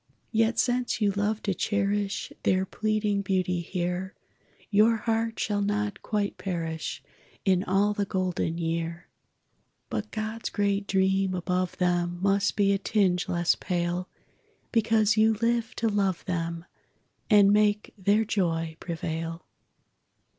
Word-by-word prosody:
Yet 225 +1 +2
since 245 0 +1
you 205 -2 +3
loved 205 +2 -1
to 200 - 0
cherish 205 +2 -1
Their 185 0 +2
pleading 215 0 0
beauty 185 -2 0
here, 180 +2 -3 0.6
Your 215 +3 +5
heart 225 0 -1
shall 205 -1 0
not 205 0 -1
quite 205 -2 -2
perish 165 -4 -4 0.4
In 185 -2 +3
all 200 +2 +2
the 205 -1 -1
golden 185 -3 -1
year; 165 0 -3 0.8
But 215 0 -3
God's 220 +1 -4
great 200 -1 0
dream 190 0 +2
above 180 0 -1
them 175 -1 +1
Must 200 +1 +2
be 200 -1 +3
a 195 - 0
tinge 190 -4 +1
less 175 0 +2
pale, 175 0 -2 0.6
Because 225 -1 +3
you 220 +1 +4
lived 230 +1 0
to 230 - +1
love 195 -4 0
them 170 -2 -3 0.6
And 205 -2 +6
make 210 0 +2
their 205 +2 +2
joy 165 -6 -1
prevail. 165 -1 -4
200 Hz, 130 wpm, -27 LUFS, 180-210 Hz, 0.8 s, And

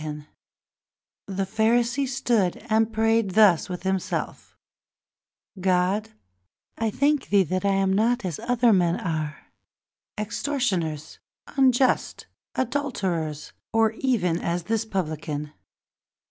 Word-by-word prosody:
And 150 -1 -6 1.0
the 195 0 -2
Pharisee 235 +6 +1
Stood 235 -7 0
and 220 +1 +3
prayed 225 -3 +1
thus 200 -5 +5
within 180 +1 -2
himself: 190 -2 -4 1.0
O 190 - -11
God, 185 +3 +1 0.7
I 225 -1 -1
thank 285 +5 +1
thee 195 -4 +4 0.2
I - - +1
am 195 -1 +2
not 230 +2 +1
as 170 -5 -3
other 245 -2 +3
men, 175 -3 +2 1.2
Extortioners, 205 - -2 0.4
unjust, 260 -1 +2 0.3
adulterers, 190 - -2 0.2
Or 225 -1 +3
even 220 -9 0
as 170 0 -2
this 225 +4 -1
Publican. 155 -6 -4
205 Hz, 105 wpm, -25 LUFS, 180-235 Hz, 1.2 s, thus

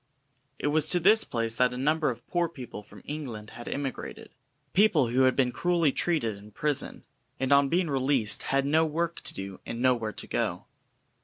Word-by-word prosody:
It 145 - -1
was 155 +1 +2
to 180 - +3
this 215 +6 +5
place 115 -1 -2
that 125 0 +2
a - - -5
number 150 +3 +1
of 120 -2 -6
poor 175 -2 0
people 125 -8 -8
from 105 - -16
England 120 -8 -6
had 120 - -10
emigrated; 140 -2 -5 0.4
people 175 - +4
who 130 +2 +3
had 130 - +3
been 130 -2 +2
cruelly 170 +1 +2
treated 130 -11 0
in 105 +1 -13
prison, 145 +6 -2 0.4
and 130 +1 +2
on 140 0 +5
being 175 +2 +1
released 135 -5 +1
had 135 0 +2
no 155 +3 +3
work 165 +2 -1
to - - -4
do 95 -1 -6
and 115 - -6
nowhere 120 -4 +2
to - - -6
go. - - -2
135 Hz, 190 wpm, -28 LUFS, 120-160 Hz, 0.4 s, this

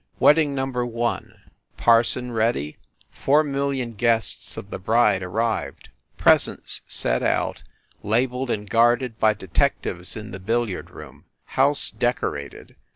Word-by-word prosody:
Wedding 150 -2 +4
Number 130 -2 -1
One: 120 0 -3 0.4
Parson 120 +2 +3
ready, 110 -10 -1 0.3
four 150 +3 +2
mil 140 -1 -1
lion 130 -4 -3
guests 115 0 0
of 100 - -8
the - - -5
bride 110 -1 +2
arrived, 110 +5 -3 0.3
presents - - +2
set - - 0
out, - - 0 0.4
la 110 +5 +2
beled 125 0 -5
and 105 -2 -2
guarded 120 +2 +2
by 110 -1 +3
detectives 90 -2 -2
in 110 +1 -8
the 95 - -7
billiard 115 0 -2
room. - - -13 0.3
House 140 +2 +2
decorated. 70 - -3
115 Hz, 130 wpm, -23 LUFS, 105-125 Hz, 0.4 s, Wedding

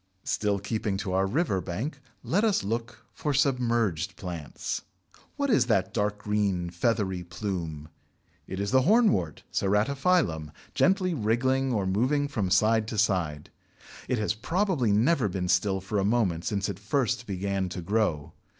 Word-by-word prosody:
Still 105 -1 0
keeping 105 0 -2
to 95 -1 -3
our 95 +1 +2
river 115 - 0
bank, 125 - -4 0.2
let 200 +6 +1
us 210 - +2
look 115 +4 -4
for 145 -2 -2
submerged 115 - +1
plants. 85 -5 -5 0.5
What 280 -2 0
is 125 - +4
that 100 -6 +1
dark 105 -1 0
green 100 -4 -1
feathery 95 -1 0
plume? 85 -5 -4 0.6
It 95 - -5
is 100 +1 -1
the 130 - +5
Hornwort 160 - +2
(Ceratophyllum) 105 - +1 0.2
gently 185 -1 +2
wriggling 130 +2 +1
or 105 -5 0
moving 130 +10 +1
from 110 -10 -2
side 110 +3 +3
to 110 - -4
side. 90 -8 0 0.6
It 125 - +1
has 105 -1 0
probably 165 - 0
never 115 +2 +3
been 90 0 -2
still 95 +1 +2
for 100 +2 -2
a - - +1
moment 100 -6 +1
since 100 -2 -1
it 100 -2 -5
first 120 +2 -1
began 95 -1 -2
to 90 - -5
grow. 90 -7 0
105 Hz, 150 wpm, -27 LUFS, 95-125 Hz, 0.6 s, the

